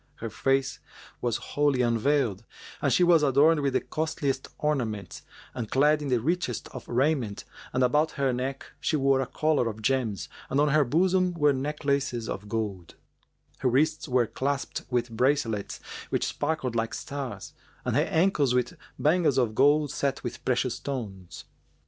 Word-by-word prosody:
Her 115 -1 -6
face 135 +2 0 0.4
was 120 -2 0 0.2
wholly 145 -3 +2
unveiled, 120 -2 +1 0.4
and - - +2
she 180 - +4
was 170 -2 +5
adorned 150 +3 +4
with 140 -2 0
the - - +2
costliest 145 -4 -2
ornaments 120 -9 -2 0.3
and 115 -3 -4
clad 150 +3 +3
in 145 - -3
the 125 -3 +2
richest 160 -1 -1
of - - -9
raiment 125 -4 0 0.3
and 130 +1 +1
about 150 +6 +2
her 135 -3 0
neck 130 +2 -3
she 145 - 0
wore 135 -2 +3
a 130 - -2
collar 150 -2 +1
of 110 0 -8
gems 120 -6 0 0.2
and 135 - +1
on 150 +1 +4
her 150 +1 +4
bosom 180 +6 +2
were 150 -3 +3
necklaces 140 -4 -1
of 105 +2 -5
gold; 105 -6 -4 0.6
her 130 - +2
wrists 155 +5 +1
were 125 -2 +3
clasped 140 +4 -2
with 120 -1 0
bracelets 115 -3 0 0.3
which - - 0
sparkled 145 -5 -2
like 115 0 -1
stars, 140 -3 -6 0.3
and - - 0
her - - +4
ankles 160 -7 +2
with 125 -1 0 0.2
bangles 155 -3 +2
of 120 -4 +2
gold 145 +4 +4
set 140 -1 -2
with 120 -2 -6
precious 130 -1 +1
stones. 100 -10 -6
135 Hz, 160 wpm, -27 LUFS, 120-150 Hz, 0.6 s, was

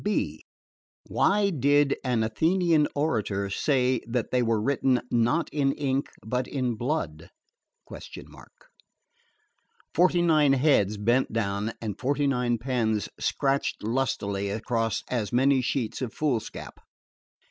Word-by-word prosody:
(b) 80 - -1 0.6
Why 200 0 +2
did 145 -1 +3
an 125 -4 +1
Athenian 160 - +2
orator 105 -9 -1
say 130 +1 +1
that 120 -1 -2
they 125 - +2
were 115 -2 +1
written 130 +1 +1
'not 120 +8 +2
in 140 -2 +1
ink, 135 -1 -1 0.2
but 125 +3 -2
in 130 -3 -1
blood'?_" 110 - -3 2.6
Forty 175 +1 +3
nine 155 -4 +4
heads 125 -7 +2
bent 120 +6 +1
down 105 0 -2
and 105 -3 -5
forty 140 +2 0
nine 125 -3 +1
pens 115 -4 -1
scratched 140 -4 -1
lustily 105 -4 -1
across 115 +2 -1
as 110 -5 -2
many 130 +2 +3
sheets 125 -1 -2
of 125 -4 -4
foolscap. 135 -8 -3
125 Hz, 115 wpm, -26 LUFS, 110-140 Hz, 2.6 s, nine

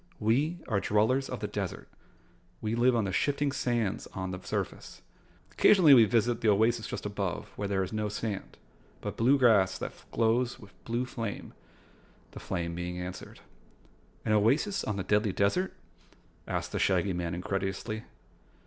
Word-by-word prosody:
"We 135 +11 +1
are 110 -5 +1
Dwellers 110 +7 +1
of - - -5
the - - -1
Desert. - - -4 0.7
We 110 0 -2
live 120 +2 +3
on 115 - +2
the 95 - -2
shifting 145 +7 +1
sands 120 -7 -1
on 95 0 -3
the 90 0 -6
surface. - - -5 0.5
Occasionally 175 -8 +6
we 120 -4 +8
visit 115 +2 +1
the 110 - +3
oasis 110 +3 +2
just - - -5
above, 100 -3 -3
where 100 - -3
there 95 -1 0
is 95 - -6
no 105 -1 -1
sand, 105 -1 -5 0.4
but - - -4
blue 130 +5 +4
grass 110 -8 +4
that - - -5 0.2
glows 120 +2 +1
with 100 -2 -15
blue 120 +2 -1
flame," 115 -5 -5 0.8
the - - -9
flame 85 -1 -3
being 90 +1 -4
answered. 90 0 -8 0.8
"An - - 0
oasis 135 - +2
on 105 - -2
the 95 - -2
Deadly 105 0 +1
Desert?" 105 - +1 0.8
asked - - -3
the - - -2
Shaggy 95 0 +2
Man 85 0 -2
incredulously. 95 +4 -3
110 Hz, 160 wpm, -29 LUFS, 95-120 Hz, 0.8 s, we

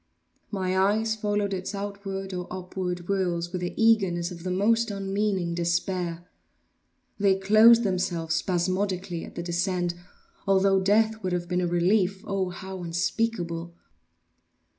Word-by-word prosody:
My 185 -2 -1
eyes 215 +4 +2
followed 205 -1 -1
its 190 +2 -4
outward 195 -1 -5
or 180 -1 -4
upward 180 -1 -4
whirls 175 -2 -1
with 180 -1 -3
the 175 - -4
eagerness 195 -6 +3
of 170 -1 -8
the 185 - -4
most 225 +5 +2
unmeaning 195 -3 -1
despair; 170 0 -1 0.9
they 200 -1 +4
closed 220 +4 +6
themselves 175 -4 -1
spasmodically 185 0 -1
at - - -10
the 170 - -4
descent, 175 0 -1 0.5
although 195 0 +4
death 220 +3 +2
would 185 -2 -2
have 175 -1 -2
been 180 0 0
a 175 - 0
relief, 185 +2 +1
oh, 195 -2 -1
how 190 +1 -7
unspeakable! 175 -1 -2
190 Hz, 135 wpm, -26 LUFS, 175-200 Hz, 0.9 s, closed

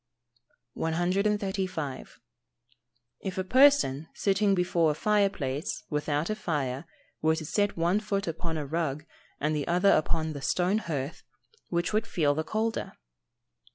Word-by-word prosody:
135. 185 -3 -1 1.0
_If 190 -2 -4
a 190 - 0
person, 255 - +4
sitting 200 0 +2
before 175 -2 +2
a - - +2
fire 205 +4 +3
place, 140 -2 -3
without 150 +4 0
a - - 0
fire, 145 -9 -2 0.4
were 160 0 +3
to 160 -1 -5
set 205 +5 0
one 170 +5 +2
foot 205 -2 -2
upon 165 0 -3
a 150 - -3
rug, 155 0 -2 0.3
and 155 +1 0
the 145 - -2
other 180 +3 +4
upon 155 0 +1
the 140 - -6
stone 185 +8 +1
hearth, 150 -6 -4 0.5
which 175 +3 -1
would 220 +2 +1
feel 150 -9 +2
the 155 +2 -1
colder? 220 +5 -2
170 Hz, 140 wpm, -28 LUFS, 150-200 Hz, 1.0 s, person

